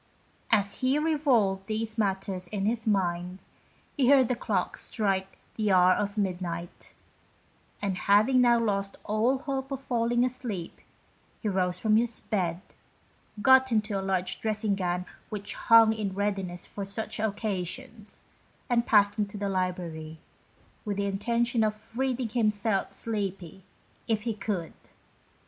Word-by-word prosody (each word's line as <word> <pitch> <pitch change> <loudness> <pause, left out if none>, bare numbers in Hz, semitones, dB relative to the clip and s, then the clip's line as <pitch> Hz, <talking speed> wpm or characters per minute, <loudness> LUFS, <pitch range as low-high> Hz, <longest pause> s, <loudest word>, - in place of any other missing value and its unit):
As 200 -2 +1
he 260 +2 +2
revolved 260 -12 +2
these 220 0 -2
matters 195 -3 -1
in 195 +1 -3
his 225 +1 -1
mind, 180 -3 0 0.6
he 265 -4 +3
heard 265 -4 +6
the 250 - +1
clocks 200 -6 -2
strike 195 -3 -1 0.2
the 215 -2 +1
hour 185 0 +6
of 205 +2 -2
midnight, 175 -3 -4 0.9
and 195 -2 0
having 215 +6 +4
now 240 -1 +5
lost 200 -3 -1
all 225 +5 +1
hope 270 0 -4
of 270 - -2
falling 240 -2 +1
asleep, 235 -9 -5 0.6
he 215 - -2
rose 180 -2 0
from 215 +1 +3
his 235 0 +1
bed, 180 -5 -2 0.8
got 260 0 +6
into 215 -1 +1
a - - -3
large 190 -1 -1
dressing 215 -1 0
gown 180 -2 -1 0.2
which 205 -2 -5
hung 225 -1 +6
in 205 -3 -3
readiness 195 -3 -2
for 200 - -6
such 200 +3 -4
occasions, 215 +2 -4 0.5
and 235 -1 +2
passed 205 -1 +4
into 205 0 -2
the 200 0 -2
library, 175 -4 -3 0.7
with 205 -2 -3
the 200 - 0
intention 235 +4 0
of 215 +1 -3
reading 255 -2 -1
himself 215 -3 +1
sleepy, 195 -4 -4 0.4
if 220 -3 0
he 230 -1 -1
could. 200 -6 -3
210 Hz, 140 wpm, -28 LUFS, 190-230 Hz, 0.9 s, heard